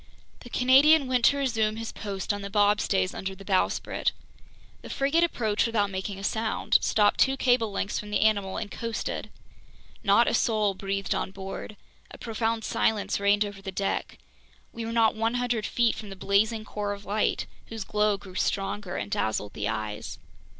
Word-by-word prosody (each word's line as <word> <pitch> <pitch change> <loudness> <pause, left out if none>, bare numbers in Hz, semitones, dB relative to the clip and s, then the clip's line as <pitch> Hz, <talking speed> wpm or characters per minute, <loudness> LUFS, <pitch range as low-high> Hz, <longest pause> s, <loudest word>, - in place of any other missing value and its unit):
The 245 - -12
Canadian 275 +5 +5
went 255 -2 0
to 280 - +5
resume 225 -6 0
his 225 0 -5
post 200 -1 -3
on 205 - -5
the 200 - -5
bobstays 205 -2 +2
under 190 0 -5
the 195 +1 -13
bowsprit. 190 -2 0 0.7
The - - -10
frigate 285 +5 +2
approached 220 -10 +1
without 205 -3 0
making 190 +1 -4
a 195 - -8
sound, 220 +1 +1
stopped 205 -1 +2
two 270 0 +4
cable 245 -4 +2
lengths 200 +1 -2
from 210 - -7
the 210 - 0
animal 200 -3 +2
and 215 -2 -5
coasted. 230 -1 -4 0.7
Not - - +5
a - - +1
soul 215 -4 +2
breathed 195 0 -2
on - - -2
board. 195 +2 -7 0.3
A - - -11
profound 225 0 -2
silence 210 -2 0
reigned 205 +1 +3
over 200 -1 -8
the 195 -1 -5
deck. 195 +1 -2 0.6
We 230 -1 -5
were 225 - -4
not 230 -1 +3
100 230 0 0
feet 235 -1 +2
from 215 -2 -8
the 195 - -7
blazing 215 +3 +1
core 205 -1 -3
of 200 0 -10
light, 210 +2 0 0.2
whose 225 -2 -5
glow 210 0 +1
grew 195 -2 -13
stronger 195 0 -2
and 100 0 -4
dazzled 105 -2 -1
the 105 - -3
eyes. 110 -1 -4
210 Hz, 180 wpm, -27 LUFS, 195-230 Hz, 0.7 s, Canadian